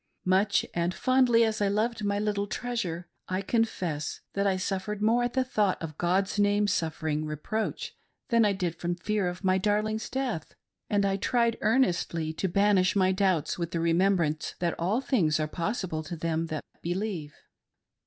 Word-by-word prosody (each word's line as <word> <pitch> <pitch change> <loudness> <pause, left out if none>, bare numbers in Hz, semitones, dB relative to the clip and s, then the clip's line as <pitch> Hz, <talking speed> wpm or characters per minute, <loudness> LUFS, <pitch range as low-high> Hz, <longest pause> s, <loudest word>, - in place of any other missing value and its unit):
Much 190 +3 +3
and 175 +1 0
fondly 255 -3 +4
as 220 -1 0
I 205 - +3
loved 215 +2 0
my 200 0 0
little 205 -1 -1
treasure, 210 -8 -3 0.2
I 185 +1 -1
confess 185 -9 -1
that 200 0 +1
I 190 -1 +2
suffered 195 +2 -3
more 225 +3 +3
at 240 0 -1
the 260 - +2
thought 210 -7 +1
of 155 -2 -7
Gk)d's 190 +4 +1
name 205 0 +3
suffering 160 -5 -1
reproach 155 +9 -3 0.4
than 230 -2 +4
I 210 - +4
did 180 -4 -2
from 175 0 -1
fear 200 +2 -1
of 180 +2 -5
my 190 0 +3
darling's 215 +2 0
death; 255 - -3 0.3
and 200 -1 +2
I 195 0 +1
tried 235 +2 +1
earnestly 175 -8 +1
to 190 - -1
banish 200 0 +3
my 185 -1 +4
doubts 185 -5 +1
with 170 -1 -2
the 170 - -2
remembrance 170 -2 +1
that 170 -1 0
all 195 +9 +1
things 180 - +2
are 155 - 0
possible 170 -1 -2
to 170 - -5
them 165 0 -1
that 155 -2 -4 0.2
believe. 175 -4 -3
195 Hz, 175 wpm, -28 LUFS, 170-215 Hz, 0.4 s, fondly